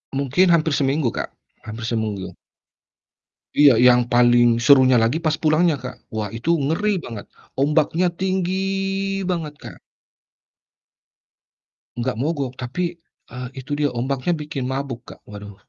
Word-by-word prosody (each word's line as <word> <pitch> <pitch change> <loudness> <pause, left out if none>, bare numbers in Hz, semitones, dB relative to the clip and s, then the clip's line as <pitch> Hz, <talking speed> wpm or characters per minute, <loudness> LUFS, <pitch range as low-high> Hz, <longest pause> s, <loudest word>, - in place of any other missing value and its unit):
Mungkin 140 +7 +2
hampir 160 -1 +2
seminggu 135 -3 +1
Kak, - - -5 0.3
hampir 110 +2 -7
seminggu. 110 -5 -3 1.2
Iya, 145 -1 +7 0.2
yang 125 0 +6
paling 120 0 +5 0.2
serunya 130 -2 +6
lagi 120 +8 +1
pas 155 0 +2
pulangnya, 155 +1 +3
Kak. 125 - -6 0.2
Wah, 110 -1 -2
itu 115 +8 -4 0.2
ngeri 185 +8 0
banget, 110 -4 -8 0.3
ombaknya 155 +4 +2
tinggi 185 -1 -1 0.8
banget, 160 -4 -2
Kak. - - -10 2.2
Enggak 120 -1 -3
mogok 140 -2 -2
tapi, 170 +7 -4 0.3
eee, 125 +1 -6
itu 135 +2 -9
dia 145 - +2
ombaknya 130 +7 -1
bikin 150 -4 -5
mabuk 130 -2 -5
Kak, - - -12
waduh 105 -1 -10
135 Hz, 125 wpm, -21 LUFS, 120-155 Hz, 2.2 s, Iya